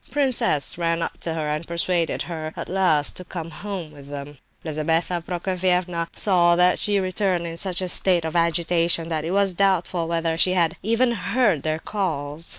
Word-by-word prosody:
Prince 275 -4 +2
S. 150 +3 0
ran 165 0 0
up - - -5
to 165 -1 -2
her 155 -2 -3
and 150 +2 -3
persuaded 170 -4 0
her, 160 0 -6
at - - -5
last, 175 -6 +2
to 180 - -6
come 170 -2 -7
home 190 -6 -6
with 140 -2 -13
them. 145 -1 -8 0.2
Lizabetha 165 +2 -1
Prokofievna 180 -1 -1
saw 175 -4 +4
that 180 +1 +3
she 205 -1 +2
returned 185 -2 0
in 165 0 -5
such 185 +1 0
a - - -2
state 175 -2 +3
of 160 - -4
agitation 170 0 +2
that 155 -1 -2
it - - -3
was 195 0 +2
doubtful 180 -2 0
whether 165 -1 -1
she 185 - +4
had 170 -3 +1
even 230 +4 +1
heard 205 - +1
their 155 +1 -1
calls. 160 -5 -4
170 Hz, 185 wpm, -23 LUFS, 160-185 Hz, 0.2 s, saw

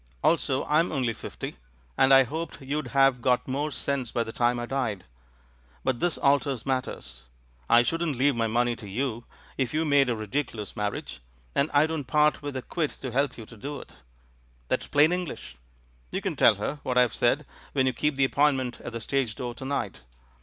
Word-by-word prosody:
Also 140 -5 +2
I'm 160 +3 +2
only 130 -6 0
fifty, - - -7 0.4
and 135 - +4
I 135 0 +8
hoped 160 +7 -5
you'd 140 0 -3
have 135 -1 +3
got 125 0 +2
more 140 +3 -1
sense 140 -3 -2
by 120 - 0
the 110 - -7
time 120 +1 +1
I 120 - -3
died. 120 -8 -2 0.8
But 130 -2 0
this 175 -3 0
alters 140 -3 +1
matters. 130 - -4 0.4
I 120 +1 +7
shouldn't 165 +1 -1
leave 140 +1 +3
my 115 -1 +1
money 120 +2 +1
to 105 - -9
you 120 +2 -2 0.3
if 130 +1 0
you 160 +1 +1
made 140 -3 +4
a 120 - +1
ridiculous 110 -1 -4
marriage, 105 -1 -4 0.3
and 140 +2 +2
I 145 +1 +5
don't 160 -3 -3
part 150 +3 +3
with 145 -1 -5
a 130 - -3
quid 160 -4 -1
to 130 - -4
help 135 +2 0
you 115 - -8
to 115 - -13
do 140 +6 -6
it. - - -13 0.8
That's - - 0
plain 150 +3 +4
English. 180 - -4 0.6
You - - -1
can - - -3
tell - - +6
her 145 - -3
what 125 -1 -1
I've 125 -2 +4
said 135 +5 +2 0.3
when 135 -2 +2
you 130 - +2
keep 150 +4 0
the 135 0 +3
appointment 135 -3 +1
at - - -7
the 115 - -4
stage 125 -3 -1
door 120 +1 -4
to 130 - -8
night! 140 - -3
135 Hz, 200 wpm, -27 LUFS, 120-145 Hz, 0.8 s, I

